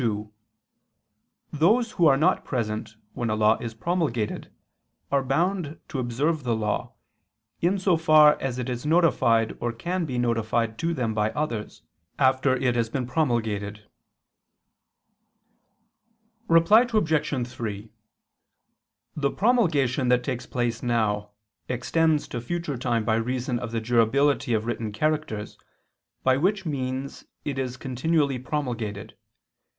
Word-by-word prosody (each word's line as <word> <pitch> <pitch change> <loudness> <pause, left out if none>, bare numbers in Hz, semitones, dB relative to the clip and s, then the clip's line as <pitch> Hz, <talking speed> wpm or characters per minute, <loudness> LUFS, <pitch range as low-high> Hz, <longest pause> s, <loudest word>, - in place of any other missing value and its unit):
2: 105 -2 -2 1.2
Those 215 - +2
who 170 -3 +3
are 135 -2 +5
not 175 +6 +2
present 110 -3 -3 0.2
when 120 - -2
a 110 - +1
law 110 +1 +4
is 115 -1 -6
promulgated, 140 -7 -2 0.6
are 140 -1 +2
bound 165 +3 -1
to 135 - -3
observe 135 +6 -1
the 120 -2 0
law, 105 -1 -2 0.7
in 180 +4 +2
so 185 -3 +2
far 155 -2 +6
as 130 -2 -2
it 125 - -3
is 125 -1 -4
notified 130 -9 +3
or 120 - -1
can 175 +9 -3
be 130 -5 -4
notified 115 -1 0
to 170 0 -1
them 120 -5 -1
by 105 0 +1
others, 120 -8 -4 0.3
after 130 -1 +3
it 125 -1 0
has 115 -1 0
been 130 +1 -2
promulgated. 110 -7 -1 2.6
Reply 185 +9 +5
Obj. 155 - +1
3: 110 -4 -6 1.2
The 140 -2 +1
promulgation 155 - +2
that 125 0 +3
takes 125 -2 -4
place 120 -2 -2
now, 105 -4 0 0.4
extends 155 +5 +1
to 120 - -4
future 165 +3 -3
time 120 -3 0
by 110 0 +2
reason 125 +1 -2
of 120 -1 -5
the 115 - -1
durability 120 +3 +2
of 110 0 -1
written 115 -2 -3
characters, 130 -3 -2 0.6
by 130 0 +3
which 190 +5 0
means 135 -2 -4 0.2
it 140 -2 -2
is 130 -1 -3
continually 140 +1 0
promulgated. 120 -7 -4
130 Hz, 130 wpm, -25 LUFS, 115-155 Hz, 2.6 s, far